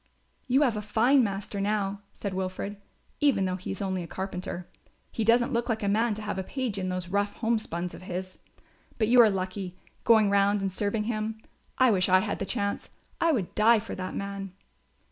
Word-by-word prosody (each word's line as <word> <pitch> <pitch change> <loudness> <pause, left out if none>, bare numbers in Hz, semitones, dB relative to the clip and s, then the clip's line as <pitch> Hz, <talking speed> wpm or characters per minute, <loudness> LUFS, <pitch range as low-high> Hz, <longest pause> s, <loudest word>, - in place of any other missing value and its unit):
"You 265 +3 +4
have 245 -6 +2
a 210 - -2
fine 240 +6 +3
master 200 -1 -3
now," 200 -1 -1
said 200 -2 -5
Wilfred, 190 +2 -3 0.4
"even 250 -10 +3
though 185 0 -1
he 185 - -7
is 195 +1 -3
only 190 -1 -1
a 170 - -6
carpenter. 180 -1 -5 0.4
He 225 - -2
doesn't 240 +4 +3
look 235 +1 0
like 220 -1 -1
a - - 0
man 220 +2 +2
to 215 - -7
have 205 -2 -3
a - - -2
page 240 -2 -3
in 185 -1 -2
those 185 -1 -3
rough 205 +1 0
home 230 -1 0
spuns 175 -3 -4
of - - -10
his. 185 0 -6 0.6
But 215 -2 +1
you 245 0 +8
are 225 - +7
lucky, 185 -1 -4 0.3
going 220 -3 +5
round 200 +1 +3
and 195 -1 -2
serving 205 +2 0
him. 220 0 -3 0.4
I 255 -2 +5
wish 185 -3 +2
I 185 0 +6
had 205 - -3
the 195 - -3
chance. 200 +1 -2 0.3
I 330 - +3
would 215 - -1
die 225 +2 +5
for 215 +1 -5
that 185 0 -5
man." 200 -1 -5
200 Hz, 210 wpm, -28 LUFS, 190-225 Hz, 0.6 s, you